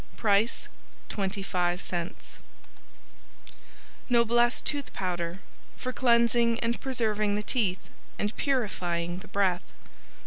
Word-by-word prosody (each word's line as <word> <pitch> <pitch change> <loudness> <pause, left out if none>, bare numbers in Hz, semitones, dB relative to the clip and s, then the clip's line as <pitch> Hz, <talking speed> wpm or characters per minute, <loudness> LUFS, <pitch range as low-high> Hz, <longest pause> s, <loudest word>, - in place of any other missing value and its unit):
Price 210 +1 +2 0.4
25c 180 -3 -2 1.7
Noblesse 240 0 +4
Tooth 290 -1 -1
Powder 175 -1 -3 0.4
For 255 - -4
cleansing 235 -1 +3
and 235 +1 -1
preserving 215 -5 +1
the 210 - -1
teeth, 205 -6 0 0.3
and 210 +1 -2
purifying 180 - -1
the 210 - -12
breath. 190 -2 +1
210 Hz, 90 wpm, -28 LUFS, 185-235 Hz, 1.7 s, Noblesse